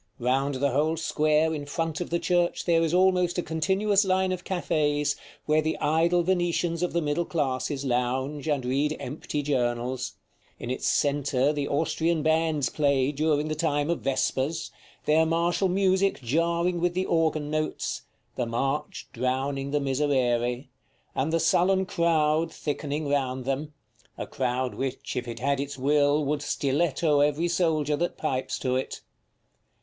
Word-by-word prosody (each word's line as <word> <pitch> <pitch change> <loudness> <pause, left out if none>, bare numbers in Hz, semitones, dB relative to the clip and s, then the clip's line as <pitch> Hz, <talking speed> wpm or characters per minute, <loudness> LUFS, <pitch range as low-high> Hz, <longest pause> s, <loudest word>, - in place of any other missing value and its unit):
Round 135 +3 0
the 140 +1 +1
whole 155 +5 +1
square 155 0 +2
in 145 -2 -5
front 165 +1 -2
of 175 - -4
the 170 - +1
church 175 0 0
there 165 -2 +3
is 165 -2 +1
almost 180 -1 +3
a 175 - 0
continuous 190 +6 +1
line 190 -1 +1
of 180 -1 -3
cafés, 150 -5 0 0.3
where 155 +1 +3
the 155 +1 -1
idle 170 +3 +2
Venetians 175 -1 0
of 180 - 0
the 170 -1 +1
middle 150 +3 0
classes 140 -3 -2
lounge, 130 +4 -1
and 145 -4 0
read 140 +4 0
empty 145 +2 -4
journals; 125 -2 -1 0.4
in 120 - -5
its 130 - -2
centre 140 -1 +1
the 145 -1 -2
Austrian 160 +2 0
bands 160 -3 +2
play 140 -2 +1
during 150 0 +1
the 155 - -1
time 150 0 0
of 170 - -2
vespers, 135 +3 -1 0.3
their 155 +1 +4
martial 170 +4 +1
music 190 +1 +2
jarring 170 +6 +1
with 175 0 0
the 185 +1 0
organ 160 -3 0
notes, 155 0 -2 0.3
the 120 - -1
march 135 +6 -2
drowning 135 +3 -1
the 145 +1 +1
miserere, 130 -3 0 0.5
and 140 +4 -1
the 165 - +2
sullen 185 +4 +3
crowd 165 -2 +1
thickening 145 0 -3
round 130 -3 -1
them, 140 +3 -2 0.5
a - - -4
crowd, 130 -1 -2
which, 135 -1 -4
if 125 0 -3
it 115 -1 -5
had 140 +3 0
its 140 0 -4
will, 145 +2 +2
would 145 +1 -1
stiletto 145 +1 +1
every 150 +4 +2
soldier 160 -4 +1
that 175 +4 -2
pipes 135 -4 -2
to 130 -1 -1
it. 130 - -3
150 Hz, 155 wpm, -26 LUFS, 135-165 Hz, 0.5 s, their